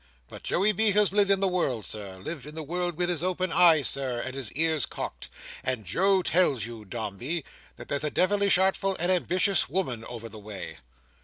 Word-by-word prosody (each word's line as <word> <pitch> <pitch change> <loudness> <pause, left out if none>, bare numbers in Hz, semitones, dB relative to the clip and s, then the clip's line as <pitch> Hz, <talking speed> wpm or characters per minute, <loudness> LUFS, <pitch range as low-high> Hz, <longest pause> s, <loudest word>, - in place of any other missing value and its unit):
But - - -10
Joey 200 +4 +2
B. 210 +1 +2
has 205 -1 +3
lived 205 -1 +3
in 195 -1 +3
the 195 - +3
world, 140 - -1
Sir: 100 -3 -5
lived 140 - -7
in 150 - -10
the 160 - -4
world 175 +2 -2
with 175 0 0
his 175 -3 0
eyes - - -5
open, 180 -4 +3
Sir, 130 -3 0
and 130 +2 -4
his 135 -5 -4
ears 160 -1 +2
cocked: - - -6 0.3
and 125 -5 -2
Joe 190 - +2
tells 145 - +2
you, 115 -2 -9
Dombey, 120 - -4 0.3
that - - -11
there's 140 +1 -1
a 150 - 0
devilish 200 +3 +3
artful 190 +1 +1
and 175 +2 +1
ambitious 185 +1 +2
woman 130 -9 -2
over 115 -1 -7
the 110 -1 -11
way." 100 -8 -8
160 Hz, 205 wpm, -27 LUFS, 120-185 Hz, 0.3 s, has